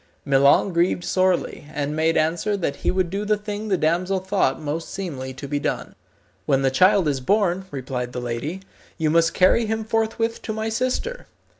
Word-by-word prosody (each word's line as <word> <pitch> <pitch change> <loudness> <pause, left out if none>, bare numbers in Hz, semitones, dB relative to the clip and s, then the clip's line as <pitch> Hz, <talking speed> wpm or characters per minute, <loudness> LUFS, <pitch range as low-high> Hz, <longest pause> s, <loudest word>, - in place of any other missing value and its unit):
Milon 140 +6 +4
grieved 175 +1 +1
sorely, 185 -5 0
and 150 0 -2
made 160 +1 +2
answer 170 +6 +1
that 165 -7 -2
he - - -1
would 185 -2 0
do 200 +2 -2
the 210 0 +1
thing 210 +1 -5
the 195 -3 +1
damsel 175 +4 +1
thought 185 -7 0
most 155 +2 -4
seemly 145 -9 -5
to 140 +2 -7
be 145 +1 -1
done. - - -3 0.5
"When 135 -2 +2
the 135 - +3
child 185 +4 +4
is 140 -2 0
born," 190 +3 +1
replied 130 -3 -4
the 125 - -4
lady, 125 +10 -4 0.4
"you 155 -2 +1
must 165 0 +3
carry 215 +5 +4
him 220 0 -1
forthwith 225 +1 -1
to 220 - -4
my 220 +1 -2
sister. 255 - -2
175 Hz, 185 wpm, -23 LUFS, 145-205 Hz, 0.5 s, Milon